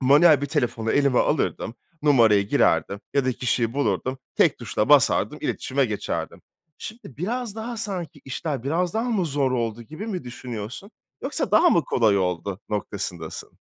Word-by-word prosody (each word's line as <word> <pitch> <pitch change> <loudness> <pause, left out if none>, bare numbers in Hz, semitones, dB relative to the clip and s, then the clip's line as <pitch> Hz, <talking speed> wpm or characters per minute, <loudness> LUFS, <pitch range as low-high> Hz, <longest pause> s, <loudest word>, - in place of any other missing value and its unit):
Manuel 145 +3 +6
bir 145 - -1
telefonu 120 -6 -1
elime 140 -3 +3
alırdım, 130 -5 0 0.3
numarayı 110 -9 +4
girerdim 100 - +2
ya 140 -2 +3
da 130 - +1
kişiyi 120 -1 0
bulurdum 130 0 -1 0.2
tek - - +3
tuşla - - -1
basardım - - +4
iletişime 135 +1 0
geçerdim. 105 -4 -4 0.4
Şimdi 220 +2 -8 0.2
biraz 225 - -3
daha 230 +1 -5
sanki 185 - -5
işler 135 -1 -3
biraz 170 +6 -1
daha 235 +2 0
mı 195 -6 +1
zor 140 -2 0
oldu 115 -2 -2
gibi 160 - -8
mi 185 - -4
düşünüyorsun? 120 - -7 0.3
Yoksa - - -2
daha 350 - +6
mı 165 - +3
kolay 110 -6 +3
oldu 90 +1 -2
noktasındasın? 95 -5 -5
135 Hz, 155 wpm, -24 LUFS, 115-170 Hz, 0.4 s, Manuel